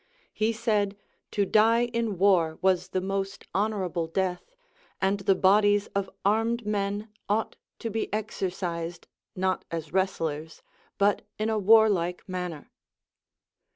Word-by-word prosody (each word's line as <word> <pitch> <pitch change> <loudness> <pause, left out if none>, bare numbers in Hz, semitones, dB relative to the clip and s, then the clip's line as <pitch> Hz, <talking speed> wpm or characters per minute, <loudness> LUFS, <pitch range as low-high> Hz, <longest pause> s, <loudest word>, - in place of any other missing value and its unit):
He 220 +1 +1
said, 210 -3 0 0.3
to 205 - +1
die 225 +4 +4
in 230 -4 -2
war 170 -4 +3
was 185 -1 +3
the 185 0 -2
most 195 +1 -3
honorable 190 -5 -1
death, 185 - -2 0.5
and 195 +1 +1
the 195 -1 +3
bodies 205 +2 +4
of 200 -1 -1 0.2
armed 225 +3 +1
men 205 +1 -2 0.2
ought 215 +2 0 0.2
to 230 - -4
be 220 +1 -2
exercised, 180 -5 -3 0.3
not 185 0 0
as 165 -2 -5
wrestlers, 165 -5 -2 0.3
but 200 0 +3 0.2
in 215 +1 0
a 220 - +1
warlike 200 -5 +4
manner. 180 -5 -5
195 Hz, 125 wpm, -27 LUFS, 180-215 Hz, 0.5 s, die